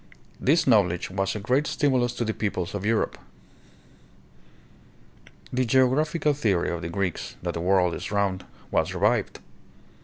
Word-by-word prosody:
This 160 +4 +3
knowl 105 -8 +4
edge 90 +2 -5
was 95 +1 -1
a - - -3
great 130 +8 +1
stimulus 130 -5 +1
to 120 - -2
the 110 - -1
peoples 100 -4 -3
of 100 -2 -4
Europe. 110 -1 0 2.3
The 130 +1 +2
geographical 135 +5 +2
theory 105 -13 0
of 85 -1 -4
the 85 - -4
Greeks, 90 0 -3
that 85 -1 -2
the 85 - -4
world 90 -1 +2
is - - -5
round, 100 -2 0 0.3
was - - 0
revived. - - 0
105 Hz, 150 wpm, -25 LUFS, 95-130 Hz, 2.3 s, knowl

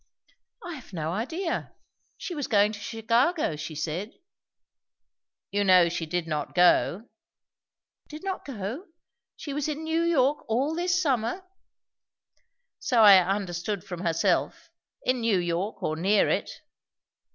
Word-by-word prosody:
"I 350 - -5
have 255 -9 -12
no 160 -2 -3
idea! 325 - -3 0.4
She 360 - -6
was 290 -5 -3
going 210 -4 +3
to 210 - -8
Chicago, 230 - 0
she 155 +1 -7
said 165 +8 -3 0.7
" - - -64
"You 205 0 +1
know 185 -3 +6
she 165 -1 -4
did 175 +1 -2
not 150 -3 -4
go?" 180 +4 +3 1.0
"Did 305 +3 -10
not 385 -1 -4
go? 250 - -6 0.5
She 290 - -7
was 295 0 -2
in 305 +1 -4
New 320 +1 0
York 295 -4 +2
all 265 +7 +1
this 350 +2 +1
summer?" 270 - 0 1.4
"So 235 -5 +3
I 200 -3 +9
understood 190 +1 -2
from 180 -3 -7
herself 165 -2 0 0.3
In 255 -1 0
New 225 -4 +2
York 175 +4 -2
or 155 - -1
near 195 +5 +3
it." - - 0
215 Hz, 140 wpm, -26 LUFS, 180-290 Hz, 1.4 s, I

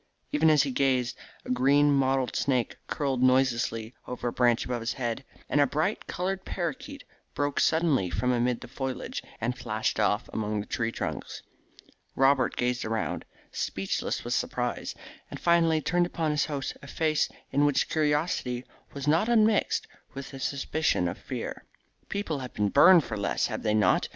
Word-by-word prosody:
Even 155 +2 +4
as 150 -3 +5
he 140 - -2
gazed 130 -2 +1 0.3
a - - -4
green 140 +3 +4
mottled 135 -1 +1
snake 130 -4 0
curled 135 -4 -1
noiselessly 125 -3 +2
over 125 -1 -3
a - - -7
branch 120 -2 +2
above 125 -1 -2
his 115 - -2
head, 120 0 -3 0.2
and 145 - +2
a 140 - +4
bright 155 +10 -1
coloured 185 +2 -2
paroquet 180 - -4 0.3
broke 145 -1 0
suddenly 160 - +2
from 125 +8 0
amid 125 0 +1
the - - -8
foliage 130 +1 -4 0.2
and 120 +3 -1
flashed 110 -2 -2
off 105 +1 +1
among 105 -1 -1
the 100 - -4
tree 115 -1 -2
trunks. - - -5 0.7
Robert 135 0 +3
gazed 125 0 0
around, 110 0 -2 0.3
speechless 95 0 -2
with - - -2
surprise, - - -2 0.3
and - - -7
finally 165 -2 +3
turned 175 +2 +1
upon 165 -3 -1
his 150 -1 +1
host 145 -3 -4
a 140 - -11
face 155 0 +1 0.2
in 140 +2 +2
which 145 -2 +2
curiosity 150 -5 0 0.3
was 140 0 -5
not 165 +9 +3
un 225 -3 +5
mixed 215 -1 +1 0.3
with 140 +1 -7
a 135 - -7
suspicion 140 - 0
of 85 - -3
fear. - - -6 0.5
"People 180 -8 -2
have 125 -1 -8
been 105 -1 +1
burned 175 - +7
for 110 -4 -5
less, 100 -1 0
have - - -3
they 105 - +1
not?" 105 - +3
135 Hz, 170 wpm, -28 LUFS, 120-155 Hz, 0.7 s, burned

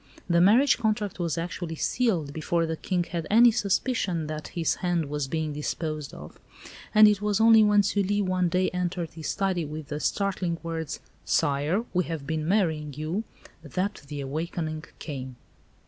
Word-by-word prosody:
The 170 -1 +3
marriage 230 +10 +5
contract 210 -4 -1
was 170 -2 -1
actually 170 0 -4
sealed 170 - 0
before 165 +2 0
the 160 0 -2
King 175 +2 -1
had 170 -2 -4
any 235 +3 +7
suspicion 200 -5 0
that 155 0 -5
his 165 -2 +2
hand 175 -3 +1
was 145 -2 -2
being 155 +1 -2
disposed 150 0 -3
of, 75 +1 -11 0.5
and 215 0 +8
it 210 -1 +2
was 210 0 +1
only 225 -1 +7
when 210 -1 +5
Sully 205 0 +1
one 185 -2 +1
day 185 +2 +1
entered 180 -2 -2
his 160 -1 -6
study 190 -3 0
with 150 -1 -7
the 150 - -3
startling 185 -2 -1
words, 165 -2 -4 0.2
"Sire, 145 - +1
we 180 -2 +1
have 160 -4 -5
been 155 +1 -2
marrying 160 -7 +1
you," 160 +9 -3 0.4
that 185 +7 -3
the 145 0 -5
awakening 155 +3 -4
came. 130 -4 -6
170 Hz, 165 wpm, -27 LUFS, 155-200 Hz, 0.5 s, and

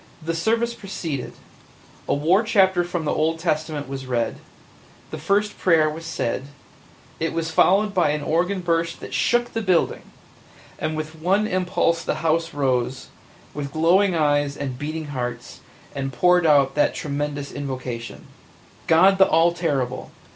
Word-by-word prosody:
The 165 +1 -3
service 230 +7 0
proceeded; 165 - -5 0.7
a - - +1
war 165 +8 +3
chapter 190 -5 +3
from 175 -2 -4
the - - 0
Old 160 +1 0
Testament 155 -3 -2
was 135 -1 -6
read; 120 -2 -1 0.7
the - - -6
first 210 +1 0
prayer 160 -4 +3
was 165 +1 -8
said; 130 -4 -2 0.7
it 165 - -1
was 165 -1 -2
followed 200 +5 +3
by 180 -5 +2
an 150 0 -1
organ 180 +5 0
burst 165 -1 -1
that - - -9
shook 240 0 +1
the 225 - -1
building, 185 -5 +1 0.8
and 155 0 -2
with 155 +1 -5
one 195 +5 +2
impulse 180 -3 0
the - - -1
house 165 +1 +1
rose, 130 -3 -1 0.4
with 140 -2 -5
glowing 175 +5 +3
eyes 145 -2 +1
and 130 -3 -5
beating 155 +2 -4
hearts, 125 -3 -5 0.3
and 135 -1 -3
poured 180 +6 +3
out 140 -3 +4
that 150 - +1
tremendous 145 -1 -4
invocation 130 -4 -6 0.6
God 190 +4 +5
the 190 - +7
all 165 +2 +4
terrible! 135 -7 -2
160 Hz, 150 wpm, -23 LUFS, 145-180 Hz, 0.8 s, the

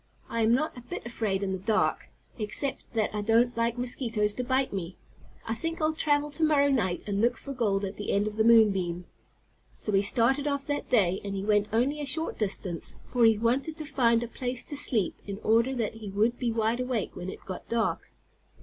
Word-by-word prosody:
I 230 - -1
am 220 0 +3
not 305 +6 +1
a 245 - -9
bit 240 - -7
afraid 215 -5 -2
in 195 - -1
the 190 - -2
dark, 215 +3 0 0.3
except 220 +6 -2
that 220 -3 0
I 210 - -1
don't 230 +3 +3
like 230 +1 0
mosquitoes 235 -4 +1
to 250 - -3
bite 260 0 0
me. 180 -2 -5 0.5
I 225 - -2
think 330 +8 -4
I'll 310 0 +1
travel 295 -1 +1
to 320 +2 -3
morrow 290 -2 +4
night, 190 -9 0
and 200 -1 -1
look 240 +1 +2
for 275 - -7
gold 205 -5 0
at 195 +1 -6
the 205 - -3
end 200 +1 +2
of 215 0 -4
the 220 - +2
moon 225 -2 +7
beam." 175 -2 -3 0.7
So 210 - -3
he 195 -1 +4
started 255 +7 +2
off 280 -1 -1
that 290 0 -3
day, 190 -6 +3
and 200 -1 -4
he 195 - -3
went 210 -1 +3
only 265 +7 +1
a 290 - -4
short 320 +4 -1
distance, 190 -5 -3
for 245 -2 +2
he 225 -1 +5
wanted 260 +8 0
to 310 - -5
find 240 -5 +2
a - - -4
place 245 +1 -3
to 290 - -6
sleep 240 -9 +1
in 200 -1 -4
order 230 +4 +3
that 225 -4 -1
he 220 -2 -8
would 220 +5 +1
be 240 -2 0
wide 225 +1 0
awake 250 -4 -2
when 180 +1 -5
it - - -10
got 185 - -7
dark. 230 -1 -1
230 Hz, 225 wpm, -28 LUFS, 205-260 Hz, 0.7 s, moon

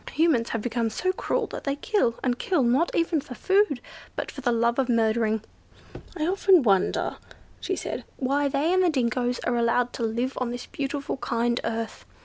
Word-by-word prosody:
Humans 300 -8 +2
have 225 -2 -2
become 235 -1 0
so 370 +12 -1
cruel - - -1
that - - -7
they 275 -1 -1
kill, 290 - +1
and 245 -1 0
kill, 350 -8 +1
not 255 +8 +2
even 330 -2 +1
for 250 - -9
food, 385 - +2 0.4
but - - -4
for 275 - -8
the 245 -2 +1
love 235 +2 +1
of 260 -2 +1
murdering. 220 -2 +2 0.7
I 310 - 0
often 370 -2 +4
wonder," 195 -5 +1 0.4
she - - -2
said, - - -4
"why 280 +2 +1
they 285 +5 +1
and 370 - +4
the 360 - +4
dingos 245 -3 0
are 245 - 0
allowed 235 +1 +1
to 235 - -4
live 235 +4 -1
on 250 - 0
this 245 0 -5
beautiful 280 0 -3
kind 235 -1 0
earth. 230 -1 -3
250 Hz, 190 wpm, -26 LUFS, 235-295 Hz, 0.7 s, often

